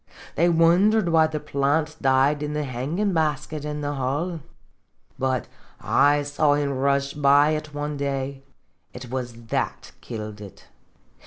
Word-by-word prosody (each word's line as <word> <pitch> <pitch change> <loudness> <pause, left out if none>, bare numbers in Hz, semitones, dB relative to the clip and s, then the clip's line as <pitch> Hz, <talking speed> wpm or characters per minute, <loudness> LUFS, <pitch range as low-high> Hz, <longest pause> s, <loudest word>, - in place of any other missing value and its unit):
They 170 +4 +3
wondered 175 +5 +4
why 160 -1 +4
the 155 -1 -4
piant 150 +3 -1
died 135 +2 +3
in 150 0 -3
tne 150 - -1
hangin' 145 - -2
basket 155 -2 -1
in 150 0 -4
the 145 0 -2
hall. 145 +6 -2
52 - - -19
Simjefc - - -33
But 130 -2 -1 0.3
I 145 0 +3
saw 145 +1 +2
him 145 -1 -1
brush 140 +1 0
by 145 0 +4
it 155 -1 -4
one 145 0 -3
day; 135 -1 -3 0.5
it 125 -1 -9
was 125 -2 -3 0.2
that - - -2
killed 110 -2 -7
it. 100 -3 -13
145 Hz, 155 wpm, -24 LUFS, 135-155 Hz, 0.5 s, wondered